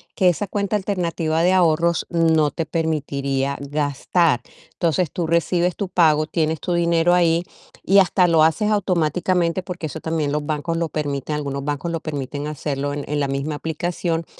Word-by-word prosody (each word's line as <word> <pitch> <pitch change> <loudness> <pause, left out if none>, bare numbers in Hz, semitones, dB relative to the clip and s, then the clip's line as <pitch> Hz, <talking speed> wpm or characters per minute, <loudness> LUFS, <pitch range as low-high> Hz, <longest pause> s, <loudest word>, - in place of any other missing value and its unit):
que 185 -2 +4
esa 200 +4 -1
cuenta 200 +1 -1
alternativa 170 -5 -1
de 180 - +4
ahorros 170 -1 +2
no 160 -3 +3
te 165 - -3
permitiría 140 -4 -1
gastar. 145 0 0 0.3
Entonces, 170 -1 0
tú 170 -2 -2
recibes 170 +2 +1
tu 200 -3 -4
pago, 155 -4 +3
tienes 160 -2 -1
tu 180 - -2
dinero 170 0 +3
ahí 170 -1 +3 0.4
y 195 +1 +5
hasta 185 -1 +4
lo 165 -2 +4
haces 210 +7 +2
automáticamente, 180 -1 +1
porque 175 -3 -5
eso 155 +3 -7
también 160 -3 -1
los 150 0 -1
bancos 155 +2 -2
lo 165 -1 0
permiten, 145 -1 -3
algunos 140 -2 -3
bancos 145 +3 -2
lo 165 - -2
permiten 145 -1 -5
hacerlo 145 -1 -3
en 145 - -4
en 150 0 -1
la 140 - 0
misma 140 +2 -2
aplicación, 165 +1 -2
165 Hz, 170 wpm, -21 LUFS, 150-175 Hz, 0.4 s, y